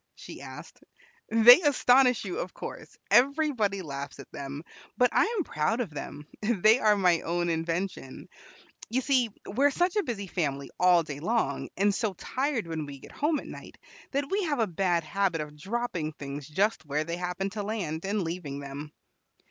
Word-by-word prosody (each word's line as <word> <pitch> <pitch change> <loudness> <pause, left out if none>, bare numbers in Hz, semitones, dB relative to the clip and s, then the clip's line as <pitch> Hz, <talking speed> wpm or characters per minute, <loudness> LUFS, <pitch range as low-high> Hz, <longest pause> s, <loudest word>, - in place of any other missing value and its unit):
she - - -10
asked. - - -11 0.5
"They 230 +7 +9
astonish 255 -4 +4
you, 370 - -3
of - - -5
course; - - -8
everybody 250 -7 +3
laughs 140 -2 -6
at 140 - -12
them; 140 +2 -6 0.3
but 250 -1 +4
I - - +4
am 375 - +1
proud 155 - -1
of 225 -9 -2
them; 145 0 -7 0.2
they 215 +1 +4
are 215 -3 +4
my 180 -4 +3
own 175 +1 -1
invention. 165 -3 -3 0.6
You 250 +4 +1
see, 255 -3 +2 0.2
we 240 +8 -1
are 285 - +7
such 355 +6 0
a - - +4
busy 215 - -4
family 140 -7 -3
all 180 -1 +5
day 145 -3 -7
long, 225 +9 -1
and 200 +1 +3
so 215 -1 -1
tired 260 - -2
when 160 -3 -4
we 140 -1 -8
get - - -14
home 300 +1 0
at - - -10
night, - - -10 0.3
that 280 0 -2
we 400 +2 +1
have 300 -3 0
a 225 - +2
bad 175 -2 0
habit 185 +1 0
of 150 -1 -6
dropping 185 -3 -3
things 140 -1 -7
just 200 +9 0
where 150 +1 -1
they 170 +2 -4
happen 180 +2 -3
to 210 0 -4
land, 195 -7 -3
and 200 0 -1
leaving 165 -4 -4
them. 140 +2 -7
195 Hz, 185 wpm, -28 LUFS, 155-240 Hz, 0.6 s, They